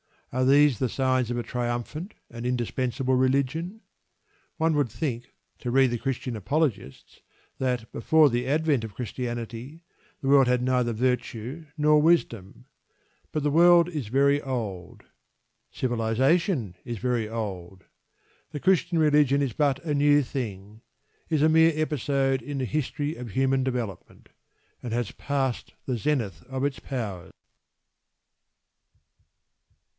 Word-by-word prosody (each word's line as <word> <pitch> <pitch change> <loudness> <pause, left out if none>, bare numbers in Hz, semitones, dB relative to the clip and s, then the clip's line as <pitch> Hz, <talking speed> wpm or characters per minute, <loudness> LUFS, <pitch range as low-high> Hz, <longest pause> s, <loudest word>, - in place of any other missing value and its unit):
Are 130 +1 +1
these 140 -2 +5
the 130 - 0
signs 130 -2 0
of 120 - -2
a 120 - -2
triumphant 125 - -4 0.2
and 115 0 -7
indispensable 125 +1 -1
religion? 140 - 0 0.8
One 160 -1 +2
would 145 -4 +1
think, 120 +1 -4 0.3
to 125 - -4
read 130 0 +4
the 120 - -2
Christian 125 -1 -3
apologists, 110 - -2 0.4
that 125 -3 -2
before 155 +5 +4
the 120 +1 -1
advent 150 -3 +1
of 105 -3 -10
Christianity 120 - -6 0.4
the 135 - -1
world 135 -2 +6
had 125 0 +2
neither 125 -2 +1
virtue 125 +4 -2
nor 150 0 +4
wisdom. 120 - 0 0.7
But 155 - -1
the 145 - +1
world 170 +2 +6
very 140 +1 +2
old. 110 -10 -5 0.7
Civilisation 125 - 0
is 120 -1 -5
very 120 -1 -1
old. 95 -5 -6 0.7
The 145 -2 -6
Christian 180 -2 +2
religion 150 -3 +4
is 135 -5 -1
but 140 0 0
a 155 -3 -1
new 145 0 +4
thing, 110 -5 -6 0.5
is 155 -3 +1
a 155 - +5
mere 160 +1 +5
episode 140 -3 0
in 145 -1 -5
the 130 - -1
history 150 +2 -2
of 120 -3 -7
human 135 +3 +1
development, 120 -8 -5 0.5
and 120 -2 -5
has 120 -3 -1
passed 135 -3 -2
the 125 -2 -1
zenith 110 - -1
of 130 0 -3
its 140 -1 -1
power. 100 -9 -5
130 Hz, 130 wpm, -26 LUFS, 120-145 Hz, 0.8 s, world